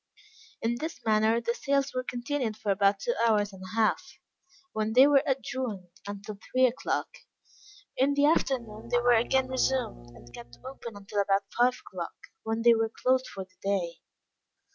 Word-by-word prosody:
In 235 +1 0
this 320 +1 -5
manner 220 +1 +3
the 235 0 -1
sales 275 +2 0
were 255 - -1
continued 250 -2 -3
for 205 - -1
about 200 +1 +3
two 240 +5 -1
hours 210 -3 +2
and 190 - -12
a 185 +3 -8
half, 225 -1 +1 0.6
when 215 0 -1
they 255 +3 +8
were 285 -1 +5
adjourned 250 -8 -3 0.2
until 205 0 -7
three 255 0 +5
o'clock. 250 0 -2 0.8
In 275 +2 +2
the 285 0 +4
afternoon 235 -7 0
they 245 - +2
were 240 0 +4
again 255 +3 +2
resumed, 255 - -1
and 120 - -16
kept 120 0 -11
open 240 -5 -8
until 200 +1 -2
about 195 0 +2
five 250 +1 +3
o'clock, - - -6 0.3
when 225 +1 -2
they 235 0 +7
were 225 -1 +1
closed 255 +3 +1
for 195 -1 -6
the 185 0 -33
day. 185 -4 -1
230 Hz, 170 wpm, -28 LUFS, 205-255 Hz, 0.8 s, they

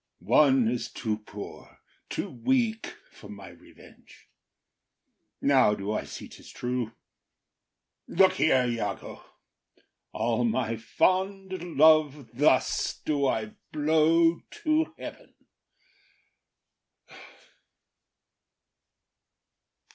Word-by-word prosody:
One 135 -5 +5
is 120 0 -2
too 110 -3 -3
poor, 105 -1 -11 0.3
too - - -3
weak 225 - -1 0.2
for 105 - -14
my 100 -1 -10
revenge! - - -19 1.1
Now 130 -7 +4
do 100 +1 -4
I 110 - -2
see - - -9
’tis - - -15
true. 125 -2 -3 1.1
Look 190 +1 +4
here, 130 -5 +3
Iago; 115 -5 -4 0.9
All 115 +2 -1
my 115 0 0
fond 190 - -1 0.2
love 150 -3 +4
thus 130 0 +1
do 145 -2 +1
I 110 -4 -2 0.2
blow 160 +2 +3 0.2
to 310 +1 +1
heaven. - - -10
135 Hz, 85 wpm, -27 LUFS, 115-165 Hz, 1.1 s, One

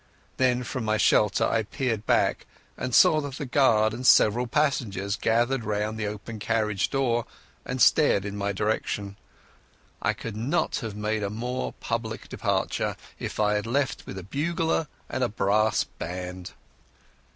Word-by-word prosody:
Then 125 -1 +2
from 125 0 -4
my 110 0 +1
shelter 105 -1 +3
I 115 - +1
peered 115 -1 -3
back, - - +2 0.3
and 125 -2 -2
saw 155 - +6
the 145 +1 -5
guard 115 -5 +3
and 120 +3 -6
several 120 -1 +5
passengers 115 -9 0
gathered 120 +3 +1
round 105 0 -1
the 105 - -1
open 105 +2 -6
carriage 105 -2 0
door 120 -4 0 0.4
and 130 +1 -3
staring 145 -8 +5
in 100 0 -5
my 100 0 -1
direction. 100 -1 -2 0.9
I - - +1
could 110 -3 -7
not 115 +6 0
have 110 -4 -5
made 105 +1 -1
a 100 - -1
more 125 +4 -3
public 115 -1 -4
departure - - -1 0.2
if - - -5
I 105 0 +3
had 105 +1 -1
left 135 +3 -1
with 95 - -7
a 95 - -6
bugler 160 - -1 0.2
and 130 +1 -2
a 120 - +1
brass 105 +1 +2
band. 90 +1 -7
110 Hz, 155 wpm, -26 LUFS, 105-125 Hz, 0.9 s, saw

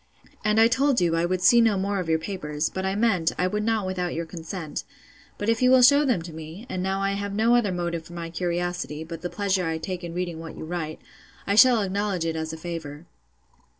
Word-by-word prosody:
And 215 0 +3
I 225 - +7
told 265 +2 +2
you, 170 -2 +2
I 165 +1 +1
would 180 0 -1
see 235 +4 +7
no 225 -3 +3
more 200 +1 -1
of 175 -3 -4
your 160 - +3
papers; 155 -3 -3
but 190 0 -3
I 190 - -1
meant, 200 -7 +2
I 180 - +1
would 210 +3 -1
not 220 -2 0
without 180 -2 -2
your 165 +1 -2
consent: 165 -1 -6 0.5
but 205 - -4
if 230 +1 +2
you 250 - +5
will 255 -1 +6
shew 285 +4 +6
them 215 -10 +1
to 165 -1 -9
me 160 +7 -9
(and 185 - -3
now 190 +1 -1
I 195 - +1
have 200 0 -3
no 225 +3 +3
other 225 -5 +2
motive 170 -2 -3
for 175 - -12
my 170 -1 -6
curiosity, 175 -2 -2
but 165 0 -8
the 175 - -3
pleasure 195 -3 0
I 160 0 -1
take 175 +2 -5
in 170 -1 -6
reading 175 -2 -3
what 165 -1 -9
you - - -6
write,) 160 -2 -4 0.4
I 200 - 0
shall 230 0 +6
acknowledge 195 -2 -1
it 165 -1 -1
as 160 0 -3
a 160 - -7
favour. 160 -2 -7
180 Hz, 245 wpm, -25 LUFS, 165-205 Hz, 0.5 s, I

